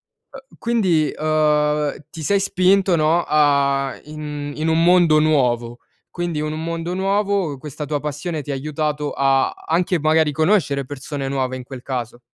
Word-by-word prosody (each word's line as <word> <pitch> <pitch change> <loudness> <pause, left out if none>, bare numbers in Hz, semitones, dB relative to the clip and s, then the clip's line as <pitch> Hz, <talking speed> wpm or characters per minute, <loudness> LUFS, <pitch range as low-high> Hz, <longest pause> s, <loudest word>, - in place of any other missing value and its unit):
Uhm, 265 -1 -16
quindi, 190 -10 +1
uhm, 150 -1 +1 0.2
ti 160 - -8
sei 200 +6 +2
spinto 190 0 +2
no, 160 +2 +2
a 140 -2 +2
in 150 -1 -6
in 155 +1 -1
un 160 +1 +3
mondo 175 -3 +5
nuovo, 120 -6 +1 0.3
quindi 170 -3 -3
o 155 - -2
in 150 - -3
un 155 +1 -4
mondo 165 +1 -3
nuovo 195 -4 0
questa 150 +1 -7
tua 145 0 -2
passione 150 +2 -4
ti 145 - -8
ha - - -1
aiutato 150 +1 -2
a 135 -1 +2
anche 175 +2 -1
magari 155 0 +3
conoscere 155 -4 +1
persone 140 +1 -6
nuove, 130 -1 -2
in 130 - -7
quel 130 0 -9
caso. 120 -3 -5
150 Hz, 165 wpm, -20 LUFS, 140-170 Hz, 0.3 s, mondo